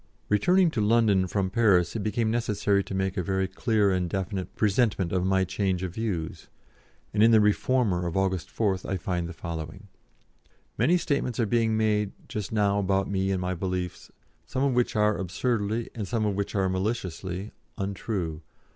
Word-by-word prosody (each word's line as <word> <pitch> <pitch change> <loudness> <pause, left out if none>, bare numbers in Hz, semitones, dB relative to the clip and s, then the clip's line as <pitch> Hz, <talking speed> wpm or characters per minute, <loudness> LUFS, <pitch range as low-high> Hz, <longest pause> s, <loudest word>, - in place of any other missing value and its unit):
Returning 175 - +4
to 120 - -1
London 105 -3 +3
from 95 0 -1
Paris, 100 -7 +3
it - - -1
became 110 +2 0
necessary 105 -4 +1
to 95 - -5
make 95 +1 -1
a - - +2
very 95 +2 0
clear 110 -3 +1
and 90 -2 0
definite 95 0 -3
presentment 105 -4 +1
of 95 0 0
my 95 0 +3
change 95 0 -1
of 90 -2 -4
views, 95 -8 -3 0.7
and 105 - +2
in 115 - +7
the 110 -1 +6
Reformer 105 -3 +2
of 85 - -3
August 95 -2 0
4th 95 -4 0
I 95 - 0
find 85 -1 -2
the - - -5
following: 85 +3 -7 0.9
"Many 160 +10 +3
statements 140 -8 -1
are 115 - +3
being 110 0 +1
made 105 -2 +1
just 105 -5 -5
now 100 -2 +2
about 95 0 0
me 95 0 0
and 95 -1 0
my 90 0 -1
beliefs, 90 0 -4 0.4
some 130 - -1
of 140 -2 +2
which 125 -1 +1
are 105 0 +3
absurdly, 110 +3 -1
and 105 -4 -4
some 110 +2 0
of 105 - +1
which 100 +1 -3
are 95 -1 +2
maliciously, 95 -1 -3 0.3
untrue. 95 -5 -3
100 Hz, 180 wpm, -27 LUFS, 95-110 Hz, 0.9 s, in